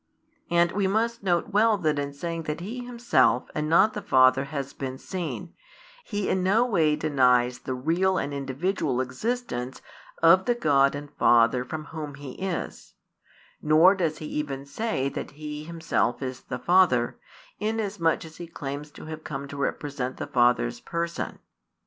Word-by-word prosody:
And 170 0 +3
we 200 -1 0
must 230 +4 0
note 175 -2 +1
well 215 +1 +4
that 155 -5 0
in 140 0 -3
saying 165 +3 -5
that 150 - -2
He 230 +8 -5
Himself 235 - +2
and 150 0 -2
not 190 +7 +5
the 210 - -4
Father 130 -2 +4
has 140 -1 -5
been 130 -1 -5
seen, 170 0 -5 0.5
He 205 - -3
in 190 - +1
no 205 +6 +3
way 160 -10 +2
denies 125 -5 +2
the 130 - -4
real 170 +8 +1
and 145 -3 -2
individual 140 0 -1
existence 130 - -3 0.4
of 185 +3 +6
the 240 - +2
God 140 -10 +3
and 145 0 -7
Father 120 +1 +4
from 155 +4 -6
Whom 150 -3 -5
He 140 -2 -8
is; 185 +4 -5 0.7
nor 155 +5 +6
does 165 -5 -1
He 155 - -7
even 140 -3 -4
say 140 -2 -2
that - - -5
He 150 0 -6
Himself 165 -6 -1
is 130 -1 -5
the - - -5
Father, 160 -6 +3 0.4
inasmuch 205 -7 0
as 160 0 -12
He 170 - -7
claims 145 -2 -6
to - - -11
have 155 0 -7
come 140 -1 -5
to 145 - -7
represent 140 -2 -3
the - - -4
Father's 120 - +2
Person. 170 0 -4
155 Hz, 165 wpm, -26 LUFS, 135-185 Hz, 0.7 s, of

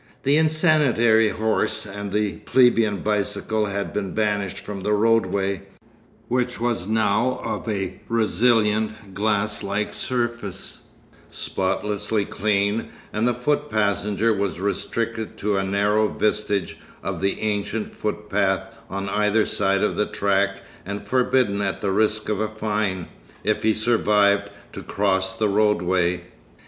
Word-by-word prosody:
The 140 +2 +4
insanitary 150 -9 +4
horse 110 0 0
and 100 0 -6
the 105 -1 0
plebeian 115 -6 +3
bicycle 105 +1 0
had 100 0 -3
been 100 -3 -3
banished 100 -3 0
from 100 -2 -7
the 105 +2 0
roadway, 105 -3 +2 0.7
which 125 0 -1
was 115 -5 -1
now 110 +3 +1
of - - -3
a 95 -3 -3
resilient, 110 -2 +1
glass 105 +1 0
like 100 +1 -2
surface, 120 -6 -3 0.5
spotlessly 105 +2 -1
clean; 100 +2 0 0.2
and 110 +3 +1
the 125 - +1
foot 145 +4 0
passenger 105 +1 +1
was 100 -3 -2
restricted 110 +3 -2
to 105 0 0
a 95 - +1
narrow 105 +2 +2
vestige 105 -4 -1 0.2
of - - -3
the 95 0 0
ancient 105 +1 -2
footpath - - -1 0.2
on 100 +1 -4
either 105 +2 +2
side 100 -1 +1
of - - 0
the 105 - +1
track 100 -1 0 0.2
and 100 +2 -6
forbidden 125 -5 +2
at 100 -1 -1
the 100 - 0
risk 110 +2 +1
of 105 -2 -1
a 110 - 0
fine, 105 -4 -2 0.4
if - - +1
he 110 - +3
survived, 105 -3 +3 0.2
to - - -6
cross 95 -1 0
the 110 - +2
roadway. 90 -4 +2
105 Hz, 135 wpm, -23 LUFS, 100-110 Hz, 0.7 s, The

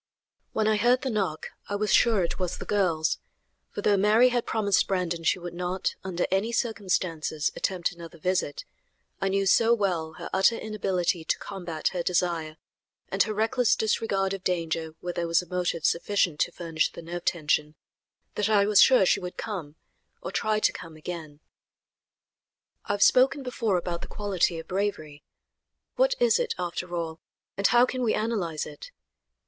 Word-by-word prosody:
When 215 -1 0
I 215 -1 +3
heard 245 +5 +3
the 265 - -1
knock 190 -8 -2 0.2
I 205 - -1
was 210 +1 0
sure 225 -6 +4
it 170 - -3
was 180 -1 -2
the - - -7
girls, 175 -6 +1 0.5
for 205 - -6
though 205 -1 +4
Mary 215 +5 +5
had 240 -1 -1
promised 205 -3 +2
Brandon 175 -3 -1
she 165 - +2
would 175 -1 -7
not, 180 +1 -2
under 180 -2 -1
any 195 +5 +1
circumstances, 180 -9 -1
attempt 180 -3 -1
another 170 -1 -11
visit, 180 -3 -1 0.6
I 195 - +1
knew 195 0 +1
so 230 +4 +5
well 175 -7 -1
her - - -7
utter 195 +4 +4
inability 190 -6 -1
to - - +1
combat 175 -5 -3
her 180 - -3
desire, 170 -3 -1 0.5
and 195 - 0
her 215 - +2
reckless 225 +2 +2
disregard 195 -3 0
of 195 -1 -6
danger 165 -2 -2
where 175 0 -4
there 170 -1 -2
was 170 +2 +2
a - - -15
motive 180 -3 -2
sufficient 175 -3 +1
to - - +1
furnish 165 -2 -1
the 170 - -10
nerve 175 +1 -6
tension, 150 -2 0 0.6
that 210 0 0
I 205 -2 +4
was 210 -1 +5
sure 255 -7 +6
she - - +3
would 180 -1 -7
come, 170 -9 -5 0.5
or - - -4
try 215 0 0
to - - +3
come, 165 -2 -9
again. 155 -2 -8 1.4
I - - -1
have 200 0 +3
spoken 270 +2 +4
before 230 -6 0
about 175 -1 -3
the - - -7
quality 190 -4 0
of 165 0 -8
bravery. 180 -7 -3 0.7
What - - +3
is 485 0 +4
it, 475 -2 -1
after 175 0 -4
all, 165 -1 -4 0.4
and 200 - +3
how 240 0 +5
can 255 0 -4
we 230 -3 +2
analyze 200 -8 -2
it? 150 - -10
185 Hz, 175 wpm, -27 LUFS, 170-215 Hz, 1.4 s, sure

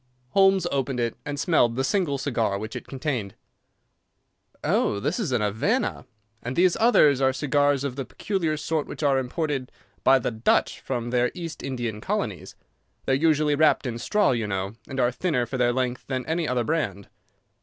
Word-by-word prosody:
Holmes 195 +4 +4
opened 135 -2 -1
it 115 -1 -1
and 145 -1 -3
smelled 120 -9 +3
the 130 - 0
single 155 -2 0
cigar 115 -7 -1
which 110 +2 -6
it - - -7
contained. 130 -8 -3 1.3
"Oh, 100 - +1
this 150 - -1
is 190 - -2
a 125 - +3
Havana, 115 - -1 0.3
and 125 +2 -4
these 180 0 +4
others 150 - +5
are 130 0 +4
cigars 145 +1 +1
of 140 -3 -3
the 135 - -3
peculiar 165 - -2
sort 155 +1 -2
which - - -7
are 140 -2 +3
imported 135 0 -3 0.3
by 135 0 +6
the 125 - -2
Dutch 110 +1 +1
from 120 -2 -4
their 125 0 +2
East 170 -3 -6
Indian 120 -5 -4
colonies. - - -3 0.5
They - - +1
are - - +5
usually 150 0 +2
wrapped 150 0 +3
in 120 -2 -3
straw, 205 - +2
you 115 -4 -1
know, 95 0 -3
and 135 -1 -5
are 125 -1 +3
thinner 125 -2 0
for 130 +2 -5
their 120 -1 +3
length 125 0 -2
than 130 -2 -3
any 160 0 -1
other 125 -2 0
brand." 100 - -2
135 Hz, 185 wpm, -25 LUFS, 120-155 Hz, 1.3 s, by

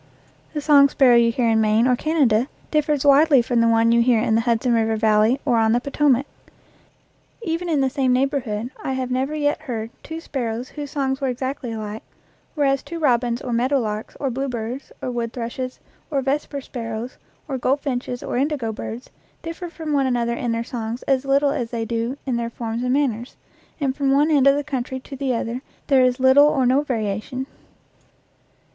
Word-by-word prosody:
The 300 - -2
song 285 -1 +6
sparrow 255 -3 +5
you 235 0 +4
hear 240 0 0
in 220 -1 +3
Maine 215 +2 +3
or 250 -1 +4
Canada 260 -6 +2 0.2
differs 300 -2 +1
widely 285 0 +6
from 235 0 +1
the 230 - +4
one 230 0 +4
you 235 0 +4
hear 235 -1 +3
in 220 - +1
the 225 - +3
Hudson 235 +1 +1
River 225 -1 +2
Valley 220 +3 +3
or 235 - +2
on 225 0 +3
the 240 - +3
Potomac. 280 0 +1 1.2
Even 345 -1 -2
in 300 -4 +2
the 265 - +2
same 270 -2 +1
neighborhood 250 -4 -1
I 265 - -2
have 260 -1 -3
never 265 +4 -1
yet 295 0 0
heard 230 -6 -5
two 320 +1 -7
sparrows 245 -6 -4
whose 290 -2 -7
songs 270 -1 -2
were 270 - 0
exactly 260 0 -3
alike, 215 -1 -5 0.5
whereas 275 -3 +2
two 335 +4 -7
robins 245 -5 +1
or 245 - -3
meadowlarks 235 -3 -1
or 270 -2 -1
bluebirds 250 0 -4
or 250 - -2
wood 235 -1 -3
thrushes 255 +1 -5 0.3
or 275 -4 -1
vesper 280 +1 -2
sparrows 230 -1 -6 0.3
or 270 -3 -3
goldfinches 255 -2 -1
or - - -3
indigo 270 -4 -1
birds 230 +3 -7 0.3
differ 335 +2 -6
from 320 -2 -5
one 275 -2 +2
another 240 -2 0
in 235 0 -2
their 230 0 -1
songs 235 0 -5
as 270 0 +1
little 280 +1 +3
as 235 -4 -2
they 230 -1 -3
do 230 +3 -2
in 255 -3 -1
their 235 0 -2
forms 230 0 -4
and 250 0 0
manners, 255 -4 -1 0.4
and 270 -3 -1
from 275 -1 0
one 290 +3 +3
end 280 -3 +4
of 275 - +6
the 290 - -1
country 260 -2 -4
to 275 - -9
the 265 -2 -1
other 235 +2 -3 0.2
there 270 -3 +4
is 250 0 +2
little 265 +3 +6
or 270 -4 +2
no 260 +3 +3
variation. 230 -1 -3
255 Hz, 195 wpm, -22 LUFS, 235-280 Hz, 1.2 s, song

